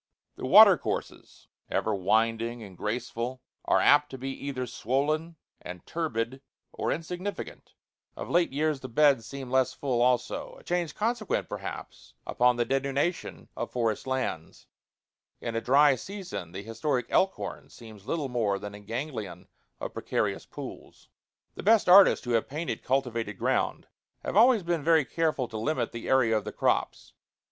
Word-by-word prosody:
The -, -, -5 dB
watercourses, -, -, +4 dB, 0.2 s
ever 110 Hz, -, 0 dB
winding 115 Hz, +4 st, 0 dB
and 95 Hz, -3 st, -11 dB
graceful, 120 Hz, +5 st, -3 dB, 0.3 s
are -, -, +3 dB
apt 145 Hz, 0 st, +5 dB
to 130 Hz, -, -8 dB
be 135 Hz, +1 st, -4 dB, 0.2 s
either 130 Hz, -2 st, -3 dB
swollen 145 Hz, +8 st, -1 dB, 0.3 s
and 90 Hz, 0 st, -9 dB
turbid 130 Hz, -6 st, -3 dB, 0.3 s
or -, -, -2 dB
insignificant; 180 Hz, +5 st, -5 dB, 0.4 s
of -, -, -6 dB
late 175 Hz, -3 st, +2 dB
years 150 Hz, +1 st, 0 dB
the 130 Hz, -, -8 dB
beds 135 Hz, -3 st, +3 dB
seem 135 Hz, -1 st, -7 dB
less 130 Hz, -1 st, +2 dB
full 130 Hz, -4 st, -1 dB
also 125 Hz, 0 st, 0 dB
a -, -, -18 dB
change 175 Hz, -4 st, -2 dB
consequent, 225 Hz, 0 st, -1 dB
perhaps, -, -, -8 dB
upon 125 Hz, 0 st, +3 dB
the 120 Hz, 0 st, 0 dB
denudation 140 Hz, +6 st, -2 dB
of -, -, -4 dB
forest 115 Hz, -1 st, -1 dB
lands. 130 Hz, -12 st, -3 dB, 0.7 s
In 115 Hz, -, -4 dB
a 115 Hz, -, 0 dB
dry 140 Hz, +3 st, +5 dB
season 130 Hz, -, -7 dB
the 95 Hz, +3 st, -7 dB
historic 115 Hz, +4 st, -2 dB
Elkhorn 190 Hz, 0 st, 0 dB
seems 110 Hz, -3 st, -14 dB
little 150 Hz, -1 st, -1 dB
more 115 Hz, -6 st, 0 dB
than 105 Hz, +1 st, -7 dB
a 105 Hz, -, -9 dB
ganglion 110 Hz, -, -6 dB, 0.3 s
of -, -, -5 dB
precarious -, -, -2 dB
pools. -, -, -10 dB, 0.4 s
IV -, -, -46 dB
The -, -, -6 dB
best 220 Hz, +2 st, +4 dB
artists 190 Hz, -4 st, +7 dB
who 120 Hz, -, -2 dB
have 115 Hz, -1 st, +1 dB
painted 155 Hz, +4 st, -4 dB
cultivated 115 Hz, -6 st, -1 dB
ground -, -, 0 dB, 0.4 s
have -, -, -4 dB
always 230 Hz, -1 st, +6 dB
been 170 Hz, -3 st, -1 dB
very 160 Hz, -2 st, +4 dB
careful 155 Hz, -2 st, -1 dB
to 110 Hz, -, -5 dB
limit 155 Hz, +8 st, -1 dB
the 115 Hz, -, -6 dB
area 125 Hz, -4 st, +4 dB
of 105 Hz, -, 0 dB
the -, -, -5 dB
crops. -, -, -1 dB
130 Hz, 155 wpm, -28 LUFS, 115-155 Hz, 0.7 s, artists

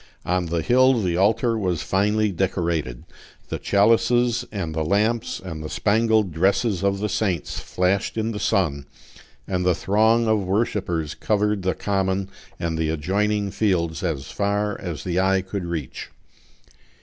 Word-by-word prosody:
On 90 Hz, 0 st, 0 dB
the 85 Hz, -1 st, -1 dB
hill 130 Hz, +4 st, +4 dB
the 90 Hz, -5 st, 0 dB
altar 115 Hz, +5 st, +2 dB
was 90 Hz, -6 st, -1 dB
finely 105 Hz, +2 st, +1 dB
decorated; 85 Hz, -8 st, -2 dB, 0.5 s
the -, -, -3 dB
chalices 115 Hz, +3 st, +3 dB
and 90 Hz, -7 st, -4 dB
the 80 Hz, 0 st, -1 dB
lamps 105 Hz, +7 st, 0 dB
and 80 Hz, -4 st, -7 dB
the 75 Hz, -, -5 dB
spangled 110 Hz, -2 st, +2 dB
dresses 95 Hz, +4 st, +1 dB
of 100 Hz, 0 st, +1 dB
the 105 Hz, +2 st, -2 dB
saints 95 Hz, -6 st, -2 dB
flashed 95 Hz, +4 st, -1 dB
in 110 Hz, +1 st, -1 dB
the 105 Hz, -, -5 dB
sun, 75 Hz, -11 st, 0 dB, 0.6 s
and 90 Hz, -1 st, -1 dB
the 90 Hz, -1 st, +3 dB
throng 110 Hz, +5 st, +2 dB
of 110 Hz, -1 st, +2 dB
worshipers 95 Hz, -5 st, -1 dB
covered 105 Hz, -1 st, 0 dB
the 95 Hz, 0 st, -1 dB
common 95 Hz, -1 st, -1 dB, 0.3 s
and 85 Hz, -2 st, -2 dB
the 80 Hz, -1 st, 0 dB
adjoining 100 Hz, +6 st, 0 dB
fields 85 Hz, -7 st, 0 dB
as 75 Hz, -7 st, -3 dB
far 105 Hz, 0 st, -1 dB
as 85 Hz, -7 st, -5 dB
the 90 Hz, 0 st, -1 dB
eye 95 Hz, 0 st, +2 dB
could 95 Hz, -1 st, -5 dB
reach. 80 Hz, -7 st, -5 dB
95 Hz, 150 wpm, -23 LUFS, 85-105 Hz, 0.6 s, hill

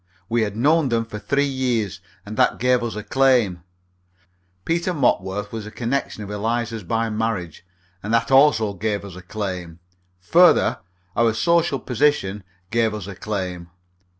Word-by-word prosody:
We 115 Hz, +2 st, +1 dB
had 105 Hz, -2 st, -1 dB
known 150 Hz, +3 st, +3 dB
them 115 Hz, -1 st, 0 dB
for 105 Hz, -2 st, -7 dB
three 140 Hz, +7 st, +1 dB
years, 120 Hz, -, -1 dB, 0.2 s
and 105 Hz, +1 st, -7 dB
that -, -, +3 dB
gave 125 Hz, 0 st, +2 dB
us 120 Hz, -2 st, -3 dB
a 105 Hz, -, -5 dB
claim; 120 Hz, -6 st, +2 dB, 1.0 s
Peter 170 Hz, +2 st, 0 dB
Mopworth 105 Hz, -7 st, 0 dB
was 110 Hz, -2 st, -6 dB
a -, -, -6 dB
connection 120 Hz, -1 st, -3 dB
of 100 Hz, -, -7 dB
Eliza's 115 Hz, +1 st, -2 dB
by 115 Hz, +5 st, -1 dB
marriage, 105 Hz, -8 st, -3 dB, 0.4 s
and 105 Hz, -, -5 dB
that 115 Hz, +2 st, +1 dB
also 130 Hz, -6 st, +5 dB
gave 105 Hz, +1 st, -2 dB
us 95 Hz, -3 st, -9 dB
a 90 Hz, -, -9 dB
claim; 90 Hz, -4 st, -5 dB, 0.4 s
further, 90 Hz, -2 st, +4 dB, 0.4 s
our 115 Hz, -1 st, +2 dB
social 170 Hz, 0 st, +2 dB
position 125 Hz, -7 st, 0 dB, 0.3 s
gave 115 Hz, -2 st, +1 dB
us 105 Hz, -4 st, -6 dB
a 100 Hz, -, -7 dB
claim. 90 Hz, -4 st, -5 dB
110 Hz, 155 wpm, -22 LUFS, 100-125 Hz, 1.0 s, also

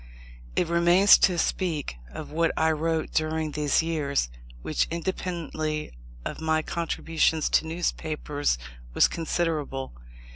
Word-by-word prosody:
It 175 Hz, -, +2 dB
remains 175 Hz, +4 st, +6 dB
to 180 Hz, -2 st, +3 dB
speak 160 Hz, -, -1 dB
of 155 Hz, -, -8 dB
what 165 Hz, +1 st, +2 dB
I 160 Hz, 0 st, +3 dB
wrote 160 Hz, +1 st, -1 dB
during 155 Hz, 0 st, 0 dB
these 150 Hz, +1 st, +2 dB
years, 140 Hz, -, -1 dB, 0.3 s
which, -, -, 0 dB
independently 165 Hz, -3 st, -3 dB, 0.3 s
of -, -, -5 dB
my 160 Hz, 0 st, +1 dB
contributions 165 Hz, -1 st, 0 dB
to 160 Hz, -, +2 dB
newspapers, 155 Hz, -, -1 dB, 0.4 s
was -, -, +6 dB
considerable. 155 Hz, -5 st, -2 dB
160 Hz, 115 wpm, -26 LUFS, 150-170 Hz, 0.4 s, remains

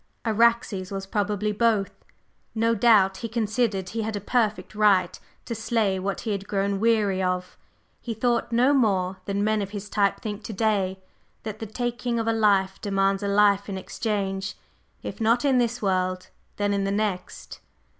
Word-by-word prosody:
Araxes 225 Hz, -4 st, +2 dB
was 195 Hz, -1 st, -4 dB
probably 210 Hz, 0 st, -1 dB
both. 215 Hz, -2 st, +1 dB, 0.6 s
No 230 Hz, +1 st, +2 dB
doubt 205 Hz, -4 st, +4 dB
he 230 Hz, -, -5 dB
considered 215 Hz, -3 st, -1 dB
he 225 Hz, +3 st, -3 dB
had 220 Hz, 0 st, -3 dB
a -, -, -2 dB
perfect 215 Hz, 0 st, -1 dB
right 200 Hz, -4 st, +3 dB, 0.3 s
to 235 Hz, -, -4 dB
slay 220 Hz, -3 st, 0 dB
what 195 Hz, +1 st, -3 dB
he 225 Hz, -, -3 dB
had 195 Hz, -1 st, -3 dB
grown 200 Hz, 0 st, -1 dB
weary 210 Hz, -4 st, +2 dB
of; 180 Hz, 0 st, -2 dB, 0.5 s
he 230 Hz, -2 st, -5 dB
thought 235 Hz, +1 st, 0 dB
no 250 Hz, +4 st, +4 dB
more 190 Hz, -8 st, +1 dB
than 200 Hz, 0 st, -1 dB
men 215 Hz, 0 st, +1 dB
of 195 Hz, -, -4 dB
his 205 Hz, 0 st, -7 dB
type 200 Hz, -2 st, +1 dB
think 210 Hz, -1 st, -6 dB
to 220 Hz, -, -5 dB
day, 195 Hz, -3 st, 0 dB, 0.4 s
that 215 Hz, -1 st, -6 dB
the 220 Hz, -, -5 dB
taking 240 Hz, +2 st, -2 dB
of 225 Hz, 0 st, -1 dB
a 225 Hz, -, +2 dB
life 200 Hz, -4 st, +2 dB
demands 195 Hz, -1 st, +1 dB
a 200 Hz, -, -2 dB
life 200 Hz, 0 st, +3 dB
in 195 Hz, -, -3 dB
exchange, 195 Hz, -1 st, -3 dB, 0.5 s
if -, -, -6 dB
not 230 Hz, +4 st, +2 dB
in 265 Hz, -3 st, +4 dB
this 235 Hz, -1 st, -1 dB
world, 185 Hz, -1 st, 0 dB, 0.3 s
then 205 Hz, 0 st, 0 dB
in 200 Hz, 0 st, 0 dB
the 195 Hz, -, -1 dB
next." 200 Hz, -3 st, -3 dB
205 Hz, 175 wpm, -25 LUFS, 195-225 Hz, 0.6 s, doubt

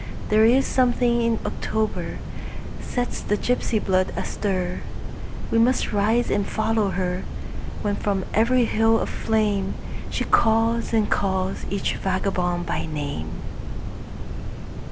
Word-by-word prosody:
There 215 Hz, +1 st, +6 dB
is 255 Hz, +4 st, +5 dB
something 245 Hz, -2 st, +3 dB
in 230 Hz, -1 st, +2 dB
October 220 Hz, -1 st, -1 dB, 0.6 s
sets 245 Hz, 0 st, -2 dB
the 210 Hz, -, 0 dB
gypsy 245 Hz, -1 st, +1 dB
blood 185 Hz, -2 st, +2 dB
astir; 185 Hz, -1 st, -1 dB, 0.7 s
We 230 Hz, -, +4 dB
must 240 Hz, 0 st, +3 dB
rise 220 Hz, +4 st, +2 dB
and 205 Hz, -, +2 dB
follow 220 Hz, 0 st, +1 dB
her, 180 Hz, 0 st, -1 dB, 0.6 s
When 205 Hz, -1 st, +1 dB
from 195 Hz, -2 st, 0 dB
every 240 Hz, +3 st, +4 dB
hill 225 Hz, 0 st, +4 dB
of -, -, -2 dB
flameShe 210 Hz, -3 st, -1 dB
calls 225 Hz, +1 st, +3 dB
and 220 Hz, -2 st, +3 dB
calls 190 Hz, -1 st, 0 dB
each 200 Hz, -, -1 dB
vagabond 180 Hz, -2 st, 0 dB
by -, -, -2 dB
name. 145 Hz, -, -3 dB
215 Hz, 115 wpm, -24 LUFS, 190-230 Hz, 0.7 s, There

